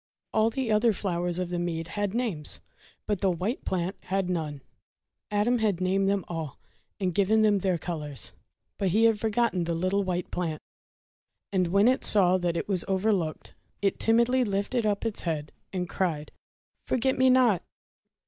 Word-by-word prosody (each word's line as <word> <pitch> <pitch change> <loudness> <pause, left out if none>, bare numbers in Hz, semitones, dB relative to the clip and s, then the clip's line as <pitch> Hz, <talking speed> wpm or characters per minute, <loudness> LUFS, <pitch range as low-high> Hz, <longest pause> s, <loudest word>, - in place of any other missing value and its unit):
All 220 +1 +3
the 240 -1 -2
other 215 +1 +4
flowers 175 -3 -1
of 180 -1 -2
the 175 -1 -2
mead 165 -1 -3
had 205 +1 -2
names, 170 - -2 0.5
but 205 -3 -1
the 195 - +3
white 185 - -2
plant 185 +1 -2
had 190 -1 -1
none. 150 -5 -3 0.7
Adam 210 +4 +2
had 210 -5 +1
named 195 +1 +1
them 200 -2 0
all, 160 -5 -5 0.4
and 185 -3 0
given 210 +4 +3
them 205 -2 +4
their 185 -2 +1
colours; 150 -5 -3 0.5
but 195 - +1
he 210 +5 +3
had 225 -2 +4
forgotten 220 -5 +1
the 170 0 -1
little 185 +4 +1
white 180 -2 -3
plant. 165 -4 -2 0.9
And 185 -2 +2
when 200 +5 +4
it 260 +1 +2
saw 185 -3 +4
that 175 -1 -1
it - - -3
was 190 -4 +2
overlooked, 190 -4 -1 0.3
it 195 - +1
timidly 235 +3 +3
lifted 215 +2 0
up 205 +1 -1
its 225 -2 0
head, 155 -3 -3 0.2
and 180 -2 -2
cried: 165 -5 -2 0.3
— - - -53
"Forget 260 +2 +1
me 260 0 +4
not!" 250 -8 +4
190 Hz, 175 wpm, -27 LUFS, 175-215 Hz, 0.9 s, other